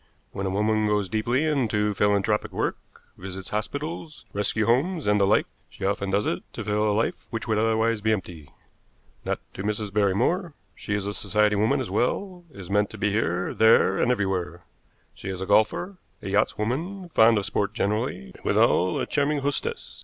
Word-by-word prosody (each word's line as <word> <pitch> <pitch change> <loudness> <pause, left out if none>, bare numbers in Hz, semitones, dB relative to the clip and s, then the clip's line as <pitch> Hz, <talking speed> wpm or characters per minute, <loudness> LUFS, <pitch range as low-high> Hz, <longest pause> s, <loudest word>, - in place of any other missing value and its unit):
When 95 0 -3
a - - 0
woman 105 +2 +1
goes 105 -2 0
deeply 120 +6 0
into 110 -9 +1
philanthropic 105 +1 +1
work, - - -2 0.4
visits 95 0 -7
hospitals, 145 +9 -4
rescue 105 +2 0
homes, 150 - +1
and 105 0 +3
the 100 - +4
like, 105 - +3 0.2
she 95 - -6
often 100 0 -1
does 100 +2 +1
it 85 - -1
to 115 - -5
fill 105 +1 +1
a - - +2
life 110 +3 +1 0.2
which 115 +1 -5
would 110 -2 +1
otherwise 110 0 +1
be 110 +1 +1
empty. 90 -7 -4 0.8
Not - - -1 0.2
to - - -6
Mrs. 105 0 -2
Barrymore. 105 - +1 0.2
She 105 - -4
is 100 -1 -2
a 100 - -3
society 105 0 +1
woman 110 +8 +2
as 130 -8 -4
well, 175 - -1
is 100 -10 -10
to 100 +2 0
be 105 - 0
met - - -3
here, 95 -4 0
there 110 -3 +4
and 125 - +3
everywhere. 95 -6 -2 0.5
She - - -8
is 95 -1 -4
a 95 - -3
golfer, 110 - +2 0.3
a 100 - -4
yachtswoman, 150 - -1
fond 115 0 +6
of 100 - 0
sport 105 +1 -1
generally, 105 - -2
and - - -16
withal 90 0 +3
a - - -1
charming 145 0 0
hostess. 140 0 -3
105 Hz, 185 wpm, -25 LUFS, 100-120 Hz, 0.8 s, fond